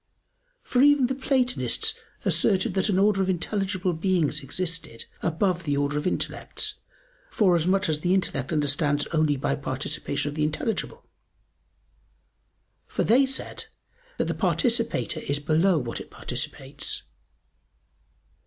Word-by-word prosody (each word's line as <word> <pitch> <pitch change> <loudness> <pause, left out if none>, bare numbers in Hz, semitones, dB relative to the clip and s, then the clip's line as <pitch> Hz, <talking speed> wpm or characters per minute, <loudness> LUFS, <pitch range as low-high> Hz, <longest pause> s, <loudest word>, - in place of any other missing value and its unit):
For 250 - +1
even 290 -2 +6
the 255 - 0
Platonists 265 - 0 0.3
asserted 190 -3 +3
that 190 +2 +1
an 190 - +2
order 200 0 +3
of 190 - 0
intelligible 185 0 -1
beings 170 -2 0
existed 165 -4 -2 0.2
above 175 +2 0
the 145 -3 0
order 145 +1 0
of 150 +4 -1
intellects, - - -2 0.5
forasmuch 185 0 +2
as 155 -1 0
the 180 +4 +2
intellect 135 -8 -1
understands 145 -1 +1
only 155 -2 +3
by 135 - 0
participation 140 +1 -2
of - - -6
the 155 - -3
intelligible; 220 - -2 1.8
for - - -1
they 265 +4 +4
said 265 - -5 0.5
that - - +1
the - - -1
participator 230 - 0
is 140 -1 -1
below 160 +5 +2
what 120 -5 -3
it - - -11
participates. 140 +1 -3
175 Hz, 125 wpm, -26 LUFS, 145-205 Hz, 1.8 s, even